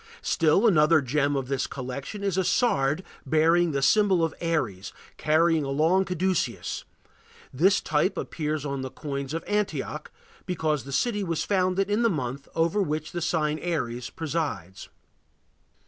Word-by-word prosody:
Still 165 +6 +3
another 155 -4 +5
gem 145 +1 0
of 135 -2 -2
this 135 -1 -1
collection 140 - -6
is 195 -3 0
a 190 - +2
sard 155 - +1 0.2
bearing 165 +2 +3
the 140 -1 -1
symbol 195 +1 +4
of 160 - 0
Aries 130 - -2 0.3
carrying 160 +1 +3
a 135 - -4
long 165 +7 +2
caduceus; 185 -1 -1 0.7
this 190 +9 +4
type 155 +5 0
appears 150 -2 -3
on 140 -1 -3
the 130 - -4
coins 140 -1 -5
of 165 +1 -3
Antioch, 210 -1 -2 0.4
because 155 -7 -1
that 140 - -7
city 210 - 0
was 165 -4 -1
founded 190 0 +1
in 205 +3 +1
the 230 - +4
month 140 - -3
over 165 +5 +2
which 155 -3 -2
the 175 - -4
sign 155 -2 0
Aries 125 -8 -3
presides. 150 - -4
155 Hz, 150 wpm, -26 LUFS, 140-180 Hz, 0.7 s, another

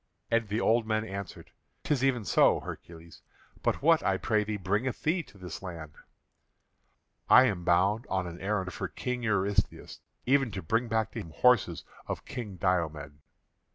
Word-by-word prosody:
And 115 -1 +2
the 105 +2 -1
old 115 -1 +2
men 110 0 0
answered: 100 -2 -7 0.3
"'Tis 140 -3 0
even 125 -5 +1
so, - - +4
Hercules. 85 -1 -10 0.4
But - - -1
what, - - +5
I - - +1
pray 105 -1 +1
thee, 105 0 -3
bringeth 100 +7 -2
thee 170 +3 +1
to 105 - -17
this 90 -3 -8
land?" 85 -5 -8 1.4
"I 130 - +9
am 95 -8 -1
bound 95 +6 +2
on 95 -1 -1
an 85 0 -8
errand 95 -2 -2
for - - -4
King 125 -1 -4
Eurystheus; 100 -3 -1 0.3
even 135 -1 +3
to 95 -2 -5
bring 115 +8 0
back 110 -1 0
to 115 - -6
him 100 - -7
horses 105 -2 +2 0.2
of - - -5
King 110 -6 -6
Diomed." 80 -6 -1
100 Hz, 165 wpm, -29 LUFS, 90-115 Hz, 1.4 s, I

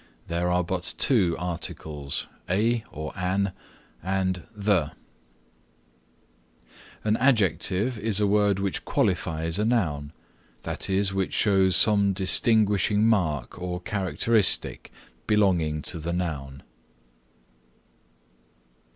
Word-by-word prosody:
There 85 +1 -1
are 90 0 +1
but 90 +1 -4
two 95 -11 +4
articles, 80 -4 -4 0.2
a 110 +5 +1
or 75 +1 -6
an 95 +1 -1 0.5
and 95 -2 -2
the. 100 -7 0 2.1
An 110 0 +1
Adjective 110 -2 +1
is 105 -1 0
a 105 - +2
word 100 -1 +2
which 100 -1 -2
qualifies 80 +2 -1
a - - +1
noun, 75 -12 -1 0.5
that - - -1
is, 95 0 +1
which 95 -1 -2
shows 95 -3 +3
some 100 -2 +4
distinguishing 105 +2 +2
mark 90 - 0
or 90 0 -4
characteristic 100 +1 0 0.4
belonging 90 -8 +1
to 85 - -3
the 85 +2 -3
noun. 70 -6 -4
95 Hz, 100 wpm, -25 LUFS, 85-105 Hz, 2.1 s, two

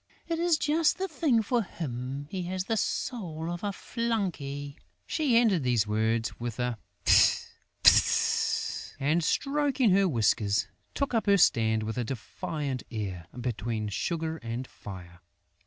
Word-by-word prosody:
It 330 -1 -1
is 340 -2 +3
just 310 +2 +2
the 385 - -2
thing 290 -9 +1
for 240 +3 +1
him: 135 - -5
he 190 - -3
has 185 +1 -2
the 225 +4 -1
soul 170 -7 -2
of 175 +2 -6
a 205 - 0
flunkey!" 180 - -3 0.3
She 280 -7 +2
ended 215 -8 +4
these 120 -4 +2
words 110 +1 0
with 120 -1 -4
a 125 -3 -2 0.3
"Fft! - - +5 0.3
Fft!" - - +3
and, 155 +5 +1
stroking 275 - +1
her 195 0 +4
whiskers, 110 -4 +2 0.3
took 280 -2 -1
up 225 -2 +1
her 200 0 +6
stand, 110 - +3
with 110 +3 -3
a - - 0
defiant 140 - -4
air, 95 -6 -5
between 110 -2 -2
Sugar 160 - -2
and 120 -1 -5
Fire. 90 -6 -11
155 Hz, 145 wpm, -28 LUFS, -, 0.3 s, her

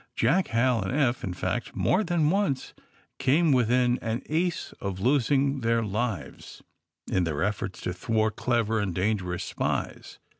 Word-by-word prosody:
Jack, 185 +2 +2
Hal 115 0 +2
and 95 - -3
Eph, 125 -4 +1
in 90 -2 -3
fact, 95 +6 -3
more 190 +4 +2
than 165 -4 +1
once 190 -9 -1 0.5
came 155 +4 +3
within 125 0 +3
an 115 +3 -3
ace 170 +3 -1
of 95 -2 -3
losing 135 +3 +2
their 115 0 +1
lives 105 - -4 0.5
in 95 - +2
their 80 -2 -1
efforts 100 -2 -3
to 90 - -3
thwart 110 +3 0
clever 115 -3 0
and 100 -4 -2
dangerous 90 -3 -1
spies. - - -3
115 Hz, 150 wpm, -27 LUFS, 100-135 Hz, 0.5 s, came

